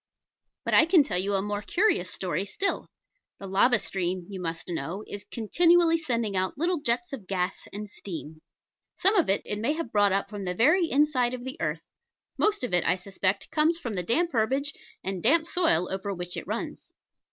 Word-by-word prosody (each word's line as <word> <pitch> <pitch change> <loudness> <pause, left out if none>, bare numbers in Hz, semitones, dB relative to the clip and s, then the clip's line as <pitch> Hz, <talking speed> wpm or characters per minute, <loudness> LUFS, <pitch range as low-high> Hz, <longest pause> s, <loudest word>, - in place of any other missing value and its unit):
But - - -1
I - - +7
can 335 -4 +6
tell 180 -10 -1
you 200 +2 0
a 195 - 0
more 205 0 -3
curious 275 - +1
story 180 -1 -2
still. 390 - -1 0.5
The 195 - -9
lava 200 +6 +4
stream, 185 -3 -3
you 190 -2 -6
must 165 -1 -4
know, 175 +4 -4
is 205 - -7
continually 330 +8 +3
sending 235 -9 -1
out 185 +6 -1
little 340 +1 0
jets 240 0 -1
of 220 -9 -7
gas 185 -1 -2
and 210 +1 -6
steam: 160 -6 -8 0.5
some 390 +3 +3
of 355 - +3
it 195 - +2
it 210 - -2
may 235 +7 +1
have 315 -7 -5
brought 205 -1 +4
up 195 +1 0
from 205 -1 -6
the 180 0 -2
very 320 - +4
inside 265 -4 +2
of 245 0 -9
the 260 - -6
earth; 160 0 -2 0.5
most 420 -8 +1
of 245 - -3
it, 175 - +3
I 180 - +2
suspect, 190 +1 -2
comes 320 +2 +2
from 245 -10 -5
the 180 - -1
damp 330 - +1
herbage 265 +5 0 0.3
and 190 -1 -3
damp 320 - +4
soil 330 - +2
over 195 +1 -3
which 180 -2 -5
it - - -6
runs. - - -5
210 Hz, 200 wpm, -27 LUFS, 185-295 Hz, 0.5 s, I